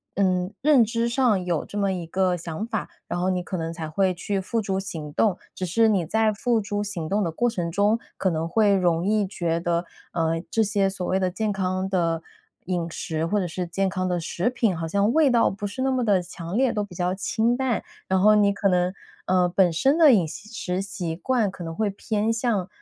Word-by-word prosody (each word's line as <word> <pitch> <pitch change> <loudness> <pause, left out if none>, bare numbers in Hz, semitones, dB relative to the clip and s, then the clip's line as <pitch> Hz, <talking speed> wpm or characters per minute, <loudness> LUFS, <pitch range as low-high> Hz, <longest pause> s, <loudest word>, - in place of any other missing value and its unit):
嗯， 185 0 +1
认 285 -4 +6
知 230 +1 0
上 235 -6 +2
有 170 -4 0
这 205 - -8
么 200 -1 +1
一 175 -2 -4
个 185 +2 +1
想 170 +5 -5
法， 220 -4 -3 0.2
然 - - -3
后 185 +1 +1
你 180 -1 0
可 180 +2 -5
能 165 -2 -3
才 165 -2 -6
会 185 +3 +1
去 195 +2 -2
付 225 +4 -1
诸 195 -2 -2
行 160 -6 -5
动。 200 0 +2 0.2
只 185 - -3
是 225 +6 +3
你 195 -6 +2
在 220 +5 +2
付 230 +2 +1
诸 205 0 -2
行 190 -6 -4
动 200 +4 +1
的 165 - -1
过 240 +9 +1
程 175 -7 -3
中 205 +4 +2 0.2
可 190 - +1
能 160 -1 -1
会 205 +2 +3
容 175 -2 +1
易 210 0 +2
觉 170 -4 -2
得， 170 0 0 0.3
嗯， 165 0 -1
这 225 - +2
些 200 -2 +2
所 190 -2 -4
谓 190 - +1
的 185 -1 +1
健 215 +2 -1
康 185 0 -1
的 170 -4 0 0.4
饮 175 -2 -2
食， 160 0 -3
或 205 +4 +1
者 185 - -1
是 175 +1 -4
健 195 +3 0
康 185 -1 -2
的 175 - 0
食 170 +5 -1
品， 235 -6 0
好 165 0 -3
像 200 +6 +1
味 305 -2 +5
道 235 -2 +4
不 205 +1 -4
是 260 +6 -4
那 265 - +2
么 255 -1 +1
地 200 -5 +3
强 175 +1 -6
烈， 255 -2 +3
都 210 - -1
比 195 -4 -10
较 180 +1 0
清 220 +5 0
淡。 255 -3 -1 0.2
然 190 0 +2
后 210 +3 +6
你 205 -1 +4
可 200 0 0
能， 180 -1 +2 0.4
呃， 185 -1 +3
本 180 0 +3
身 270 - +2
的 310 -4 +8
饮 190 -9 +4
食 190 +1 -4
习 175 -4 -4
惯 235 +1 +1
可 180 - -9
能 165 0 -5
会 215 +1 0
偏 215 +2 -1
向， 225 -5 0
190 Hz, 250 characters per minute, -24 LUFS, 175-215 Hz, 0.4 s, 的